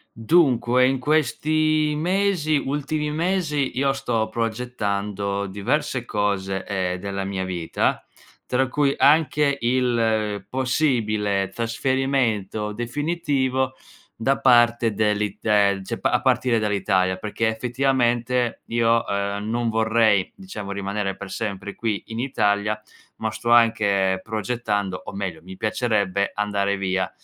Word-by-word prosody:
Dunque 125 -2 +3
in 135 0 +1
questi 155 +2 +1
mesi 175 -2 +1
ultimi 150 +2 -2
mesi 155 -5 -1
io 135 0 +2
sto 115 -5 -1
progettando 105 -4 -2
diverse 120 +7 -1
cose, 100 -3 -1
ehm, 90 -3 -2
della 100 +1 -4
mia 95 -1 -3
vita, 90 -3 -1 0.4
tra 130 +1 +1
cui 140 +1 +1
anche 150 -1 +4
il 115 -5 +1
possibile 110 -8 0
trasferimento 115 -4 -1
definitivo 130 +1 -1 0.4
da 135 +5 +1
parte 120 -2 +4
dell'It 105 -1 -1
ehm, 100 -2 +3
cioè - - -4
pa - - +1
a - - +2
partire 120 -3 +2
dall'Italia. 95 -3 +1
Perché 105 +4 -2
effettivamente 120 +1 0
io, 115 0 +2
ehm, 100 +1 -2
non 120 +1 0
vorrei 110 -3 +2
diciamo 110 - -7
rimanere 100 0 -2
per 100 -1 -8
sempre 100 -2 -4
qui 110 -4 -2
in 115 0 -6
Italia, 105 -4 0 0.4
ma 110 - -2
sto 120 +2 -4
anche 100 -5 +3
progettando 105 -4 -2
o - - -7
meglio, 95 -3 -4
mi 95 +2 -10
piacerebbe 100 -3 0
andare 100 -1 0
via 95 -1 -1
115 Hz, 120 wpm, -23 LUFS, 100-130 Hz, 0.4 s, anche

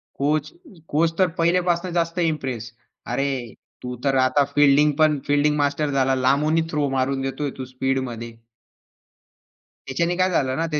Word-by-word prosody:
Coach 150 +2 0 0.4
coach 165 +2 +1
तर 185 - +5
पहिल्यापासून 175 +1 +1
जास्त 170 0 -1
इम्प्रेस. 135 -9 -2 0.4
अरे 135 +4 -1 0.5
तू 125 0 -5
तर 135 -1 +2
आता 140 +2 +2
फील्डिंगपण 145 +1 +4
फील्डिंग 145 +1 +2
मास्टर 145 +1 0
झाला. 135 -1 +2
लांबूनही 145 +5 +2
थ्रो 150 -2 0
मारून 135 0 0
देतोय 135 +2 -3
तू 130 - -4
स्पीडमध्ये. 130 -3 -3 1.5
त्याच्याने 170 +6 0
काय 185 +1 +2
झालं 130 -6 0
ना, 165 - 0
145 Hz, 135 wpm, -22 LUFS, 130-160 Hz, 1.5 s, तर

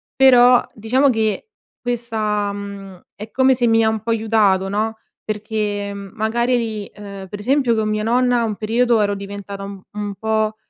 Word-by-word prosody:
però 250 -2 +6
diciamo 255 +6 +2
che 220 - -1 0.3
questa, 220 -4 -2
mhmm, 200 -2 -8
è 215 +2 -8
come 260 +4 +3
se 245 -1 +1
mi 225 0 +4
ha 220 - +3
un 220 0 -1
po' 225 - -6
aiutato, 215 -4 +2
no. 220 +2 -1 0.3
Perché 210 -1 -3
magari 220 +5 -1
di 220 -3 -4
ehm, 200 -2 -9
per 205 +2 -7
esempio 255 +1 +2
con 215 -1 0
mia 215 0 -1
nonna 245 +1 +2
un 215 -2 -2
periodo 230 +2 +2
ero 205 -1 +1
diventata 200 0 -7
un 200 0 -7
un 205 -1 -5
po', 220 0 0
215 Hz, 170 wpm, -20 LUFS, 205-235 Hz, 0.3 s, però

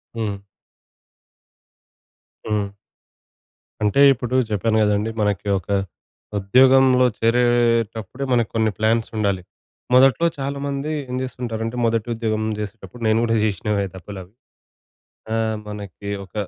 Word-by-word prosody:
హ్మ్. 105 -3 -2 2.1
హ్మ్. 105 -2 -2 1.1
అంటే 105 +7 +3
ఇప్పుడు 125 0 -4
చెప్పాను 110 +2 +1
గదండీ. 105 +1 +1
మనకి 105 -2 -1
ఒక 90 - -19 0.7
ఉద్యోగంలో 130 +5 +5
చేరేటప్పుడే 115 0 +1
మనకు 120 -2 +2
కొన్ని 110 -1 +2
ప్లాన్స్ 110 +1 +1
ఉండాలి. 100 -3 0 0.5
మొదట్లో 135 +5 +5
చాలా 140 +1 -3
మంది 140 +2 -3 0.2
ఏం 125 - -3
జేస్తుంటారంటే, 115 -3 -4
మొదటి 115 0 0
ఉద్యోగం 110 -1 -2 0.2
జేసేటప్పుడు, 105 +2 -8
నేను 110 +1 +3
గూడా 115 -1 +1
జేసినవే 100 0 0
తప్పులవి. 95 +1 -10 1.0
ఆహ్, 110 -1 0
మనకి 100 -1 -7 0.2
ఒక - - -26
110 Hz, 105 wpm, -21 LUFS, 105-120 Hz, 2.1 s, ఉద్యోగంలో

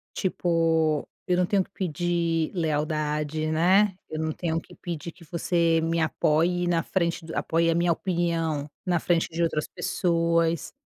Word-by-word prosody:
Tipo, 165 -4 +1 0.2
eu 180 -1 +2
não 180 - +2
tenho 195 0 +2
que - - -14
pedir 170 -2 -1
lealdade, 155 -1 -1
né? 185 +5 +4 0.2
Eu 155 - -4
não 160 0 -1
tenho 165 0 -2
que - - -16
pedir 170 -2 -6
que 170 -1 -17
você 170 0 +1
me 165 +1 0
apoie 165 +3 +1
na 170 -1 +2
frente 170 -3 -1
do 160 - -7
apoie 165 +1 +1
a 165 - +1
minha 170 0 +3
opinião 165 -4 -1 0.2
na 175 -1 +2
frente 170 +1 +1
de 165 +1 -2
outras 155 -2 0
pessoas. 170 -2 0
165 Hz, 160 wpm, -26 LUFS, 160-175 Hz, 0.2 s, né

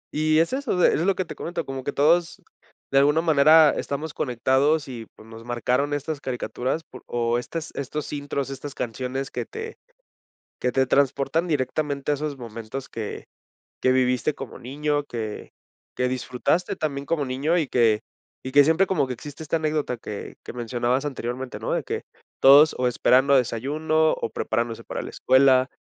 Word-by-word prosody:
Y 155 +1 +2
es 165 +8 +2
eso 265 -7 -1
de 180 - +4
es - - +1
lo 190 +2 +2
que 185 - -2
te - - -7
comento, 170 -1 -4
como 135 -1 -5
que 145 - -2
todos 165 +4 +2 0.5
de 135 - +5
alguna 145 +3 +4
manera 155 0 +6
estamos 150 +2 -4
conectados 135 +5 +1
y 115 -4 -7
pues 110 - -16
nos 115 0 -11
marcaron 125 +4 0
estas 145 +1 -3
caricaturas 130 +4 -3
por 130 - -13
o 120 0 0
estas 160 +5 -6
estos 140 +2 -5
intros, 140 -2 -3
estas 135 +1 -7
canciones 130 +4 -4
que - - -4
te 450 +1 -7 0.8
que 125 -1 -1
te 130 -1 +2
transportan 140 +5 +1
directamente 145 -1 -1
a - - +3
esos 145 -1 -4
momentos 115 +2 -7
que 110 -2 -6 0.5
que 130 - +3
viviste 130 +2 +2
como 135 - -8
niño, 145 +3 -1
que 115 -6 -6 0.5
que 125 - +1
disfrutaste 130 +7 -1
también 140 -2 -3
como 150 -2 -1
niño 140 +7 0
y 155 - 0
que 115 -4 +2 0.4
y 130 - -5
que 145 +1 +8
siempre 160 +6 +3
como 145 -8 0
que 125 - -3
existe 145 +5 -10
esta 160 +2 -1
anécdota 155 -5 -1
que 105 -2 -8
que - - -7
mencionabas 120 +2 -1
anteriormente, 130 -2 -4
¿no?, - - -3
de - - 0
que - - -4 0.4
todos 145 +3 +7
o 125 - +1
esperando 130 +3 +4
desayuno 155 +6 +1
o - - -3
preparándose 115 0 -2
para - - -5
la - - -7
escuela 130 0 +4
140 Hz, 175 wpm, -24 LUFS, 125-155 Hz, 0.8 s, que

